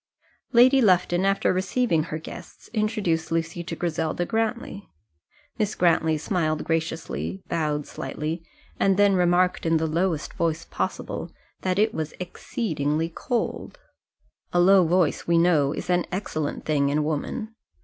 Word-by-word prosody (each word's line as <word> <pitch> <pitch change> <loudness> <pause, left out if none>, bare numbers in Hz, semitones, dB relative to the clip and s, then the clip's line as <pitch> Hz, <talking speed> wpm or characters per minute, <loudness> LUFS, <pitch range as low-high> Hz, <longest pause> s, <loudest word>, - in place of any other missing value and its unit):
Lady 255 +2 +6
Lufton 180 -3 +3
after 195 -1 +2
receiving 185 -2 +1
her 155 - -4
guests 160 - -11
introduced 210 -8 0
Lucy 165 +1 -1
to 175 - -5
Griselda 165 0 -1
Grantly. 225 -1 -2 0.7
Miss 210 -1 0
Grantly 160 -2 +3
smiled 155 -2 -1
graciously, 160 - -3
bowed 150 -3 -1
slightly, 155 +5 -4 0.4
and 195 -1 +3
then 205 -1 +5
remarked 180 0 +2
in 165 0 +3
the 160 - 0
lowest 165 0 -1
voice 165 0 -1
possible - - -4 0.3
that 185 0 0
it 215 +1 +3
was 155 -1 -4
exceedingly 165 - -2
cold. 240 +8 -3 0.7
A 175 - +2
low 185 0 +6
voice, 175 -2 +1
we 170 0 +3
know, 165 -5 +3
is - - -5
an 180 -1 +1
excellent 155 -6 -3
thing 145 -2 +2
in 150 +1 +1
woman. 160 - -3
170 Hz, 140 wpm, -25 LUFS, 155-195 Hz, 0.7 s, Lady